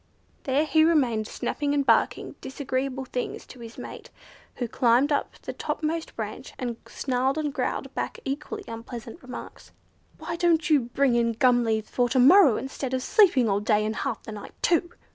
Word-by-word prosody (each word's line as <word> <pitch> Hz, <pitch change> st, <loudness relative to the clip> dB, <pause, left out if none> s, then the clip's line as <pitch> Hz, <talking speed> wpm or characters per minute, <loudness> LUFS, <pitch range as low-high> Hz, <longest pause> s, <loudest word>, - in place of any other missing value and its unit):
There 280 Hz, +3 st, +2 dB
he 315 Hz, +1 st, +4 dB
remained 255 Hz, -10 st, +2 dB
snapping 290 Hz, +4 st, -2 dB
and 280 Hz, -1 st, +1 dB
barking 230 Hz, -3 st, +2 dB
disagreeable 265 Hz, 0 st, -3 dB
things 250 Hz, -1 st, -4 dB
to 255 Hz, -, -13 dB
his 230 Hz, -1 st, -10 dB
mate, -, -, -9 dB, 0.5 s
who 245 Hz, -, -3 dB
climbed 245 Hz, +5 st, +3 dB
up 285 Hz, -, 0 dB
to -, -, -20 dB
the -, -, -5 dB
topmost 320 Hz, +1 st, -3 dB
branch, -, -, -6 dB
and 240 Hz, -3 st, -4 dB
snarled 265 Hz, +2 st, -1 dB
and 300 Hz, -2 st, -1 dB
growled -, -, -3 dB
back -, -, -3 dB
equally 300 Hz, +10 st, -4 dB
unpleasant 230 Hz, 0 st, -8 dB
remarks. 255 Hz, -1 st, -10 dB, 0.5 s
"Why 335 Hz, -, -5 dB
don't 330 Hz, -3 st, +2 dB
you 300 Hz, -, +6 dB, 0.2 s
bring 275 Hz, -3 st, +3 dB
in 235 Hz, -1 st, +2 dB
gum 245 Hz, 0 st, +3 dB
leaves 220 Hz, -1 st, -1 dB
for 245 Hz, -1 st, +1 dB
to 260 Hz, -, 0 dB
morrow, 285 Hz, -, +7 dB
instead 265 Hz, -1 st, -4 dB
of 255 Hz, -, -2 dB
sleeping 340 Hz, -, +4 dB
all 200 Hz, -1 st, +2 dB
day 210 Hz, 0 st, +2 dB
and 220 Hz, +1 st, -2 dB
half -, -, -3 dB
the -, -, -8 dB
night 210 Hz, -1 st, -9 dB
too?" 340 Hz, 0 st, +2 dB
260 Hz, 180 wpm, -26 LUFS, 235-295 Hz, 0.5 s, morrow